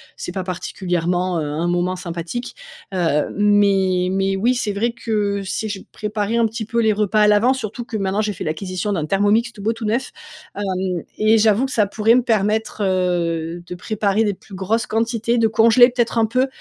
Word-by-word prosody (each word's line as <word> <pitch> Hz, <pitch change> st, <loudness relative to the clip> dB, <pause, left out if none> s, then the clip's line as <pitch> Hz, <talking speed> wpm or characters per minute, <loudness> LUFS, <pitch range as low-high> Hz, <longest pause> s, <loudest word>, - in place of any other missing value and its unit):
c'est -, -, -6 dB
pas 190 Hz, 0 st, -4 dB
particulièrement, 180 Hz, -1 st, -2 dB
heu, -, -, -2 dB
un 155 Hz, +4 st, -2 dB
moment 175 Hz, +1 st, 0 dB
sympathique. 175 Hz, +7 st, -5 dB, 0.4 s
Heu, 160 Hz, -5 st, +1 dB
mais 195 Hz, -3 st, +3 dB
mais 195 Hz, 0 st, 0 dB
oui, 245 Hz, +5 st, +2 dB
c'est 215 Hz, -4 st, -1 dB
vrai 225 Hz, +4 st, 0 dB
que 210 Hz, -3 st, -1 dB
si 200 Hz, +3 st, -3 dB
je 205 Hz, -2 st, -5 dB
préparais 210 Hz, +1 st, -2 dB
un 230 Hz, -, +3 dB
petit 225 Hz, +1 st, -5 dB
peu 235 Hz, +2 st, -2 dB
les 220 Hz, -2 st, +3 dB
repas 210 Hz, 0 st, +1 dB
à 210 Hz, -, +5 dB
l'avance, 235 Hz, +6 st, +4 dB
surtout 230 Hz, 0 st, -5 dB
que 230 Hz, -2 st, -5 dB
maintenant 195 Hz, +1 st, 0 dB
j'ai 210 Hz, -1 st, -1 dB
fait -, -, -6 dB
l'acquisition 185 Hz, +5 st, -3 dB
d'un 155 Hz, -5 st, -1 dB
Thermomix, 205 Hz, +6 st, +2 dB
tout 210 Hz, -, -12 dB
beau 225 Hz, -, +1 dB
tout 225 Hz, 0 st, -7 dB
neuf, 235 Hz, +5 st, -1 dB, 0.4 s
hem. 185 Hz, -3 st, -2 dB
Et 215 Hz, +1 st, +4 dB
j'avoue 220 Hz, +4 st, +3 dB
que 265 Hz, -, -5 dB
ça 210 Hz, -, +3 dB
pourrait 220 Hz, +3 st, +2 dB
me 250 Hz, -, +4 dB
permettre, 220 Hz, -1 st, 0 dB
heu, 175 Hz, -3 st, -1 dB
de 180 Hz, -, -7 dB
préparer 210 Hz, +2 st, 0 dB
des 205 Hz, -2 st, 0 dB
plus 190 Hz, +1 st, -13 dB
grosses 220 Hz, +5 st, -1 dB
quantités, 230 Hz, +1 st, 0 dB
de 225 Hz, -, +4 dB
congeler 230 Hz, +3 st, +6 dB
peut-être 240 Hz, -1 st, -1 dB
un 225 Hz, -, +4 dB
peu? 255 Hz, +4 st, +1 dB
205 Hz, 200 wpm, -20 LUFS, 185-225 Hz, 0.4 s, congeler